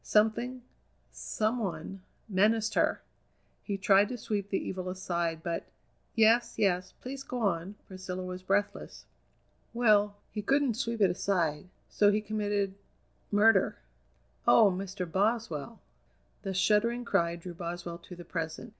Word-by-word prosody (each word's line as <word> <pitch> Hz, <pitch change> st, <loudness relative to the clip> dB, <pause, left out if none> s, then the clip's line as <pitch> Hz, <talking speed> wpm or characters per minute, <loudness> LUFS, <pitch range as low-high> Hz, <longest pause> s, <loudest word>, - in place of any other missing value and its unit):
Something, 235 Hz, +4 st, +1 dB, 0.5 s
some 220 Hz, +3 st, -1 dB
one, 195 Hz, -2 st, -4 dB, 0.3 s
menaced 215 Hz, +2 st, +2 dB
her! -, -, +1 dB, 0.6 s
He 200 Hz, -2 st, -3 dB
tried 195 Hz, +1 st, +4 dB
to 250 Hz, -, -4 dB
sweep 205 Hz, -3 st, -3 dB
the 195 Hz, -, +1 dB
evil 185 Hz, -1 st, -4 dB
aside, 170 Hz, -3 st, -2 dB
but 170 Hz, -1 st, -3 dB, 0.3 s
" -, -, -41 dB
"Yes, 225 Hz, +1 st, +4 dB
yes, 185 Hz, -3 st, +1 dB
please 270 Hz, +2 st, -6 dB
go 250 Hz, -2 st, -5 dB
on!" 190 Hz, 0 st, -1 dB
Priscilla 185 Hz, -1 st, -6 dB
was 185 Hz, 0 st, -6 dB
breathless. 200 Hz, +2 st, -2 dB, 0.7 s
"Well, 210 Hz, -3 st, +4 dB, 0.2 s
he 210 Hz, -, -3 dB
couldn't 275 Hz, +3 st, +2 dB
sweep 230 Hz, -1 st, -2 dB
it 190 Hz, -3 st, +5 dB
aside; 175 Hz, -4 st, 0 dB, 0.2 s
so 205 Hz, -1 st, +4 dB
he 210 Hz, -, +2 dB
committed 205 Hz, -2 st, -1 dB, 0.6 s
murder." 205 Hz, -1 st, +4 dB, 0.7 s
"Oh! 215 Hz, -4 st, +7 dB
Mr. 190 Hz, 0 st, -4 dB
Boswell!" 210 Hz, +1 st, -1 dB, 0.6 s
The 195 Hz, -2 st, -4 dB
shuddering 230 Hz, +5 st, +2 dB
cry 170 Hz, -6 st, +1 dB
drew 175 Hz, +1 st, -8 dB
Boswell 170 Hz, 0 st, -6 dB
to 180 Hz, +1 st, -11 dB
the 175 Hz, 0 st, -11 dB
present. 165 Hz, +6 st, -4 dB
200 Hz, 135 wpm, -30 LUFS, 180-220 Hz, 0.7 s, Oh